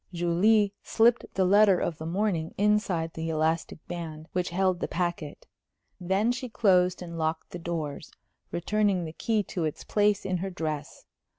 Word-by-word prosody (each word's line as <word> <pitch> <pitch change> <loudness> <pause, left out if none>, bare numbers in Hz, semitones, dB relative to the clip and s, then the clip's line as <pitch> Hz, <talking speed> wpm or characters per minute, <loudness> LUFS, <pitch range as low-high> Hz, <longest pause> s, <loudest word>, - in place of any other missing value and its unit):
Julie 195 +4 +3
slipped 230 +1 +3
the 190 - +3
letter 200 0 +5
of 165 - -2
the 160 - -5
morning 175 -3 -1
inside 200 -6 +1
the 160 0 -4
elastic 160 0 -1
band 160 -3 -6
which 180 0 -1
held 185 0 +1
the - - -2
packet; 170 -4 -3 0.5
then 195 +6 +1
she 250 0 -4
closed 185 -5 +2
and 170 -1 -7
locked 160 0 -2
the 175 - -6
doors, 160 -4 -4 0.4
returning 195 0 0
the 160 - -7
key 220 +3 0
to 175 - -1
its 155 -2 -3
place 205 -1 +1
in 185 -1 0
her 190 +2 -3
dress. 155 -5 -5
180 Hz, 165 wpm, -27 LUFS, 165-205 Hz, 0.5 s, letter